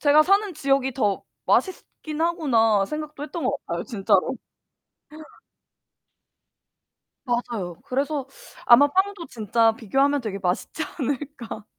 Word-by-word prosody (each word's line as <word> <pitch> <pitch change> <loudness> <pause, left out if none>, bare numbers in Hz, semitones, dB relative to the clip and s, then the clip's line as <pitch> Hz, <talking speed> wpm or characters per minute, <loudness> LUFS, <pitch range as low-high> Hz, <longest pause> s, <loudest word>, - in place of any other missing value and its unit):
제가 300 +1 +6
사는 395 +2 +2
지역이 275 -2 +1
더 210 -6 0 0.2
맛있긴 315 -4 -1
하구나 240 - +2
생각도 300 +1 -6
했던 305 +1 -5
것 255 - +1
같아요. 170 0 -3
진짜로. 215 +2 +1 2.9
맞아요. 235 -8 -3
그래서 275 +1 -2 0.4
아마 250 +4 +7
빵도 380 +2 -1
진짜 225 -1 +2
비교하면 270 +6 +1
되게 205 -4 -4
맛있지 185 - -2 0.2
않을까? 265 -5 -4
265 Hz, 255 characters per minute, -24 LUFS, 225-305 Hz, 2.9 s, 아마